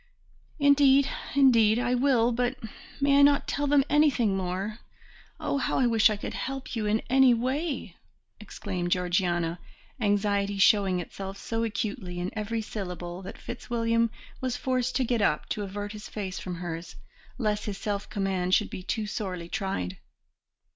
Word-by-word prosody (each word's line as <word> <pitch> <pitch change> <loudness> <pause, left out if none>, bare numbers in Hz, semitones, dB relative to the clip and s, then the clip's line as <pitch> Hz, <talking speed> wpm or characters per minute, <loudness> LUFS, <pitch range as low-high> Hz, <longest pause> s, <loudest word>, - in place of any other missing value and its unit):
"Indeed, 280 -2 +5 0.3
indeed, 230 -6 +5
I 245 0 +1
will, 245 -2 +3
but 245 +2 0 0.4
may 280 0 +4
I - - +7
not 285 0 +4
tell 290 0 -1
them 285 -1 +4
anything 280 -9 +3
more? 190 +4 -3 0.6
Oh, 280 - -1
how - - 0
I 260 - +3
wish 225 -2 +5
I 215 - -1
could - - -6
help 270 -1 -5
you 215 -2 -1
in 215 +1 +1
any 260 -1 +5
way," 260 - -2 0.4
exclaimed 185 -4 -4
Georgiana, 175 -2 0 0.4
anxiety 205 -2 +1
showing 195 -2 +4
itself 195 +2 -7
so 225 +2 -2
acutely 205 -5 -3
in 180 +2 -3
every 220 +1 -2
syllable 180 -4 -6
that 190 - -9
Fitzwilliam 230 -1 -1 0.3
was 255 -1 -1
forced 255 -1 -1
to 260 - +2
get 240 -2 0
up 150 -7 +1
to 210 - -2
avert 205 +1 -5
his 210 -1 -9
face 195 -3 -5
from 180 -1 -5
hers, 170 -1 -6 0.4
lest 210 -4 -1
his 205 -2 -4
self 205 -1 -3
command 190 -2 +1
should 210 - 0
be - - -6
too 215 +3 -2
sorely 185 -5 -4
tried. 95 - -3
215 Hz, 160 wpm, -27 LUFS, 190-250 Hz, 0.6 s, I